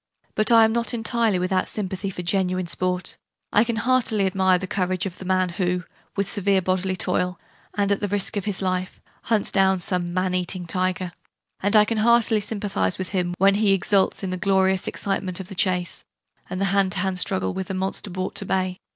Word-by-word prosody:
But 215 +1 +3
I 225 -1 +8
am 220 - +1
not 235 +1 -1
entirely 225 -3 +1
without 185 +1 0
sympathy 195 -1 -3
for 180 -2 -6
genuine 185 0 0
'Sport': 180 +1 -1 0.4
I 210 - +6
can 235 -1 -2
heartily 225 -4 +2
admire 190 -1 +3
the 185 - -4
courage 185 -1 -1
of 185 -2 -6
the 190 - -8
man 185 0 +1
who, 180 0 -1 0.3
with 200 -1 0
severe 200 -1 +1
bodily 185 +1 0
toil, 180 0 -1 0.4
and 205 -1 +1
at 200 - +2
the 205 - -1
risk 205 +2 -1
of 200 - -2
his 200 -2 -2
life, 185 0 -2 0.3
hunts 220 -3 +1
down 190 -1 +3
some 175 -1 -1
'man 185 +1 0
eating' 180 0 -2
tiger: 185 0 -1 0.5
and 200 +2 +1
I 210 0 +7
can 225 0 -1
heartily 230 0 +4
sympathize 205 -3 -1
with 185 - -4
him 180 -3 -1
when 195 +1 +5
he 205 -1 +3
exults 195 +1 +1
in 190 - -2
the 185 - -2
glorious 190 0 +2
excitement 195 -2 -2
of 190 0 -8
the - - -7
chase 180 -2 -1 0.5
and 185 +1 -4
the 195 - +1
hand 195 -2 +2
to - - -4
hand 185 0 -1
struggle 95 - +1
with 190 - -4
the 190 - -4
monster 190 +2 -2
brought 185 +1 -4
to 200 - +1
bay. 185 -1 -1
190 Hz, 210 wpm, -23 LUFS, 185-205 Hz, 0.5 s, I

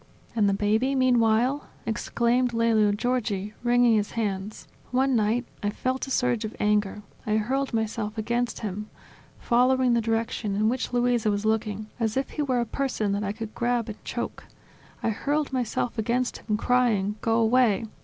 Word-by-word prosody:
"And 210 -3 +3
the - - +2
baby, 220 +7 +1
meanwhile?" 250 +1 +2 0.2
exclaimed 235 +2 0
Lelio 225 -2 +3
Giorgi, 210 -3 -1
wringing 245 -1 +4
his 210 -1 -1
hands. 205 -2 -3 0.2
"One 260 +1 +2
night 225 +3 +1 0.2
I 205 - 0
felt 255 +5 -2
a - - -7
surge 245 -3 +1
of 215 +1 -5
anger; 210 -1 +1 0.2
I 215 0 +2
hurled 265 +5 -1
myself 220 -1 -2
against 235 +2 -1
him, 210 0 -4 0.5
following 250 +1 +3
the 235 - +3
direction 225 -2 -1
in 215 +2 +2
which 255 +1 -2
Luisa 245 -2 +2
was 205 +1 -1
looking, 215 -1 0
as 225 0 0
if 270 - -1
he 305 - -3
were 255 -4 +1
a - - -1
person 235 -4 -1
that 200 +1 -1
I 200 - -1
could 220 0 -7
grab 240 -1 0
and 215 - -9
choke; - - -5 0.6
I 225 - +2
hurled 285 +6 -1
myself 245 -1 -1
against 240 +3 0
him, 215 -2 -1
crying: 220 -4 +1
"Go 225 0 +2
away! 230 -2 +3
230 Hz, 170 wpm, -26 LUFS, 210-245 Hz, 0.6 s, wringing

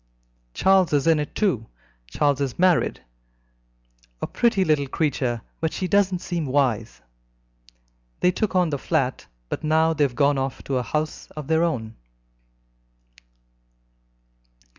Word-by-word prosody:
Charles 190 -3 +3
is 145 0 +2
in 165 -2 +4
it, 150 - -5
too. 135 - 0 0.4
Charles 140 - +1
is 135 -3 -2
married 180 -2 +2 1.2
a - - -2
pretty 225 -5 +1
little 150 -3 +1
creature, 130 -6 -1 0.2
but 160 -1 -1
she 185 - -3
doesn't 190 -1 +2
seem 170 -5 -3
wise. 125 - 0 1.2
They 180 - +4
took 195 +1 -2
on 180 -3 +3
the 140 - -2
flat, 135 -5 -1 0.2
but - - -5
now 160 +1 +3
they 150 - +1
have 130 -4 0
gone 140 +1 +3
off 135 0 -4
to 135 - -1
a - - -1
house 150 +6 -3
of 150 - -5
their 160 +3 +2
own." 115 -10 -2
150 Hz, 140 wpm, -23 LUFS, 135-170 Hz, 1.2 s, in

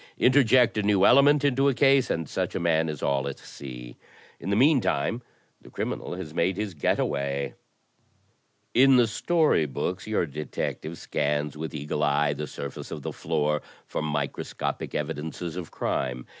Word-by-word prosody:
Interject 125 -3 +4
a - - +2
new 100 -1 +3
ele 135 +3 +7
ment 145 +1 +4
into 140 0 +3
a 135 - 0
case 135 -1 +4
and 80 -2 -1
such - - -3
a - - 0
man 80 -1 +2
is 75 -2 -5
all 70 -1 +1
at 70 - -5
sea. - - -10 0.4
In 95 - -5
the 100 - +2
mean 135 +4 +5
time 115 +2 0 0.4
the - - -15
criminal - - -4
has 85 -4 -7
made 90 +3 +1
his 105 -2 -3
*get 75 - +1
away.' 70 0 -1 1.2
In 135 +2 +6
the 120 -1 +6
story 150 - +2
books 90 - -3
your 110 -5 +1
detective 75 +2 -4
scans 75 0 -1
with 80 +1 -5
eagle 75 0 -3
eye 75 0 +2
the 75 +1 -5
surface 70 0 -7
of - - -7
the - - -4
floor 75 0 0 0.2
for - - -4
microscopic 75 -2 -3
evidences 80 +2 -4
of 90 -3 -6
crime. 65 -1 -2
80 Hz, 170 wpm, -26 LUFS, 75-115 Hz, 1.2 s, ele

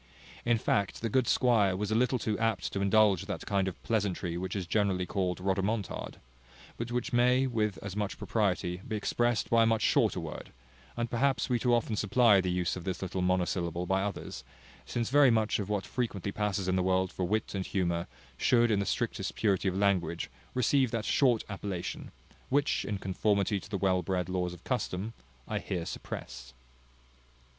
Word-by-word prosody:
In 120 -1 +3
fact, 100 -2 0
the 115 - -1
good 130 -1 +2
squire 110 -7 +3
was 105 +2 -2
a - - +2
little 125 +3 +2
too 110 -3 -1
apt 115 -5 0
to 100 - -1
indulge 100 -1 +3
that 100 - -4
kind 100 -2 +1
of 95 - -5
pleasantry 95 -6 -1
which 95 +2 -3
is 95 -3 -2
generally 95 -1 +1
called 90 -2 -1
rhodomontade: 95 +3 -2 0.6
but 115 +1 -5
which 125 +1 -2
may, 125 +2 +4
with 110 -6 -1
as 100 -1 -5
much 105 -1 -2
propriety, 90 -4 -1
be 110 - -2
expressed 120 +2 0
by 115 0 +5
a - - +5
much 115 -1 +2
shorter - - +3
word; - - -7 0.5
and 120 -1 -2
perhaps 135 +3 +1
we 125 -1 +2
too 120 0 +3
often 115 -2 0
supply 105 0 +4
the 90 - -2
use 90 -1 0
of 90 - -7
this 95 +1 -3
little 95 0 -3
monosyllable 90 -1 0
by 95 +2 +1
others; 100 -1 -5 0.4
since 120 0 -2
very 145 -1 +6
much 110 -2 +2
of 100 -1 -4
what 105 -2 -1
frequently 100 -6 -3
passes 100 -2 -1
in 95 - +2
the 95 - +2
world 95 0 +1
for 95 - -3
wit 110 +4 -1
and 95 -2 -3
humour, 85 -3 -1 0.3
should, 120 - +3
in 105 - +2
the 100 - -1
strictest - - -2
purity 100 -3 +1
of 95 0 0
language, 95 -4 0 0.2
receive 130 +1 +3
that 110 -1 -2
short 125 -5 +3
appellation, 95 -3 -5 0.4
which, 145 +2 +1
in 105 - -2
conformity 100 +1 0
to 95 - -13
the 100 - -2
well 95 -1 +2
bred 90 +1 -2
laws 90 -1 -1
of 85 - -17
custom, 110 -4 -2 0.3
I - - -1
here 90 -3 -3
suppress. 60 -5 -7
100 Hz, 190 wpm, -30 LUFS, 95-115 Hz, 0.6 s, very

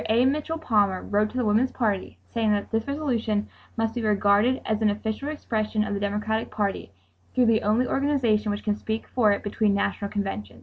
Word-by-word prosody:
A. 235 +3 +4
Mitchell 300 +4 0
Palmer 205 - +1
wrote 210 +1 +1
to 250 - -7
the 250 - +1
Woman's 220 +5 +2
Party 210 -6 -1
saying 225 -2 +1
that 205 -1 -2
this 225 +2 -1
resolution 240 -8 -1 0.3
must 225 0 0
be 240 - -3
regarded 210 +4 +3
as 220 0 -1
"an 215 - +4
official 220 +7 -3
expression 215 -7 -1
of 210 - -3
the 200 - -2
Democratic 210 +2 -1
Party 200 - -2 0.4
through 250 -1 +4
the 225 -1 +3
only 220 +5 +2
organization 255 -7 +1
which 205 0 -2
can 210 -1 +1
speak 220 +1 -4
for 225 -5 +3
it 200 - -1
between 205 0 +1
national 200 0 -1
conventions." 195 - -4
215 Hz, 200 wpm, -25 LUFS, 205-240 Hz, 0.4 s, A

